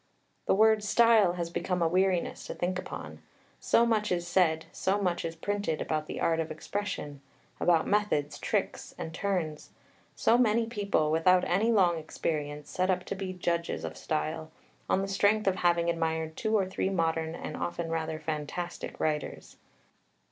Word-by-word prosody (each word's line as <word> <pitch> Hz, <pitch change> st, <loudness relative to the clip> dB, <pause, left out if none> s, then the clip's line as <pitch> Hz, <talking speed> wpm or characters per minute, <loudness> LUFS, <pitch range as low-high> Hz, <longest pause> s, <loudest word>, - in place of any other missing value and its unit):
The -, -, +4 dB
word 220 Hz, +1 st, +5 dB
"style" 220 Hz, -3 st, +5 dB
has 170 Hz, -1 st, -4 dB
become 180 Hz, 0 st, -1 dB
a -, -, +4 dB
weariness 185 Hz, +1 st, 0 dB
to -, -, -5 dB
think 180 Hz, +1 st, -1 dB
upon; -, -, -8 dB, 0.4 s
so 235 Hz, -, +3 dB
much 215 Hz, -3 st, +1 dB
is 175 Hz, -1 st, 0 dB
said, 175 Hz, -3 st, +2 dB
so 195 Hz, +2 st, 0 dB
much 180 Hz, -3 st, 0 dB
is 165 Hz, 0 st, -4 dB
printed 200 Hz, -2 st, -2 dB
about 155 Hz, -1 st, -2 dB
the -, -, -5 dB
art 165 Hz, 0 st, +1 dB
of 160 Hz, -, -2 dB
expression, 155 Hz, -4 st, -4 dB, 0.4 s
about 170 Hz, -2 st, +3 dB
methods, 200 Hz, -9 st, 0 dB
tricks, -, -, -2 dB
and 160 Hz, -, -6 dB
turns; 170 Hz, -5 st, -2 dB, 0.5 s
so 235 Hz, -, +3 dB
many 230 Hz, -1 st, +3 dB
people, 200 Hz, -9 st, 0 dB
without 180 Hz, +3 st, +4 dB
any 210 Hz, +6 st, +2 dB
long 180 Hz, -6 st, +3 dB
experience, 150 Hz, -1 st, -4 dB
set 185 Hz, +4 st, -1 dB
up 180 Hz, -1 st, +1 dB
to -, -, -4 dB
be 190 Hz, -1 st, -4 dB
judges 170 Hz, -2 st, -2 dB
of -, -, -6 dB
style, 155 Hz, 0 st, -3 dB, 0.4 s
on 195 Hz, -, +2 dB
the -, -, -2 dB
strength 205 Hz, +2 st, +2 dB
of 195 Hz, -1 st, +2 dB
having 170 Hz, -1 st, +2 dB
admired 160 Hz, -1 st, -1 dB
two 220 Hz, -1 st, 0 dB
or 195 Hz, -, +2 dB
three 190 Hz, 0 st, -2 dB
modern 165 Hz, -3 st, 0 dB
and -, -, -6 dB
often 170 Hz, -1 st, -3 dB
rather 160 Hz, -1 st, -2 dB
fantastic 160 Hz, +3 st, -5 dB
writers. 150 Hz, -2 st, -3 dB
175 Hz, 170 wpm, -29 LUFS, 160-200 Hz, 0.5 s, word